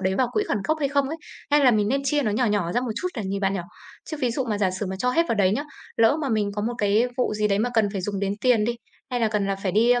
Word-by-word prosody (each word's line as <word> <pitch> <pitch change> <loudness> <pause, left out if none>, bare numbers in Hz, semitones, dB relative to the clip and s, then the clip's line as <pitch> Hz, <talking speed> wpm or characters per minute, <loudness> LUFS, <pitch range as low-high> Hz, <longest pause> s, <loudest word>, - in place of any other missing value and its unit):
đấy 190 0 0
vào 250 +4 +1
quỹ 420 - +1
khẩn - - +1
cấp 315 - +2
hay 280 - +1
không 280 -1 +1
ấy? 320 - -4 0.3
Hay 295 0 +5
là 255 - +7
mình 210 -3 +2
nên 275 +4 +1
chia 295 +1 +1
nó 215 - 0
nhỏ 235 +4 +1
nhỏ 205 -5 0
ra 245 - +1
một 250 - -3
chút 365 - -1
để 220 - -2
nhìn 195 +1 -2
bạn 195 0 +1
nhỉ? 190 - -1 0.5
Chứ 310 - -3
ví 250 -2 +1
dụ 265 +3 -1
mà 215 -4 -2
giả 195 -2 +2
sử 190 +2 -4
mà 190 - -4
cho 250 +3 +1
hết 330 - +3
vào - - +2
đấy 195 -3 +3
nhớ, 280 +7 -1 0.3
lỡ 230 +6 +4
mà 280 - -1
mình 215 -3 0
có 205 - -2
một 240 +2 -1
cái 210 +4 +3
vụ 250 -4 0
gì 210 0 +1
đấy 200 - +1
mà 240 +4 0
cần 220 -2 +3
phải 195 - -2
dùng 195 +1 -3
đến 200 -1 0
tiền 245 -4 +3
đi, 235 +2 -1 0.3
hay 245 - -1
là 225 - +3
cần 210 -2 0
là 195 0 -1
phải 195 -2 -3
đi, 225 +5 +4
a, 245 0 +4
220 Hz, 350 wpm, -24 LUFS, 200-250 Hz, 0.5 s, là